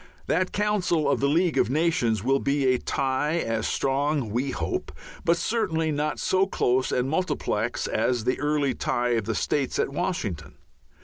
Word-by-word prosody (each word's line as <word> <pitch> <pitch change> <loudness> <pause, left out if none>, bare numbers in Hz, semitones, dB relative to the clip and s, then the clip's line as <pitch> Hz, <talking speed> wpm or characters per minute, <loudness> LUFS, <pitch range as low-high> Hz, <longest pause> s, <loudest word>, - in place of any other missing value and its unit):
That 185 +3 0
council 205 -6 +1
of 140 - +2
the 140 - +2
League 170 +2 +2
of - - +2
Nations 130 - +1
will 135 +2 +2
be 140 0 0
a 125 - 0
tie 135 +3 -1
as 115 -8 -1
strong, 140 -3 0
we 125 +5 -1
hope, - - -3 0.3
but 170 +1 +3
certainly 170 -8 0
not 150 +1 -1
so 190 +1 +2
close 130 -7 +1
and 125 +1 +1
multiplex 180 +6 -1
as 125 -3 0
the 125 +2 0
early 145 -2 +1
tie 120 +1 -1
of 115 -3 0
the 110 0 -2
States 140 -3 -1
at - - +1
Washington. 120 - -3
140 Hz, 170 wpm, -26 LUFS, 125-165 Hz, 0.3 s, but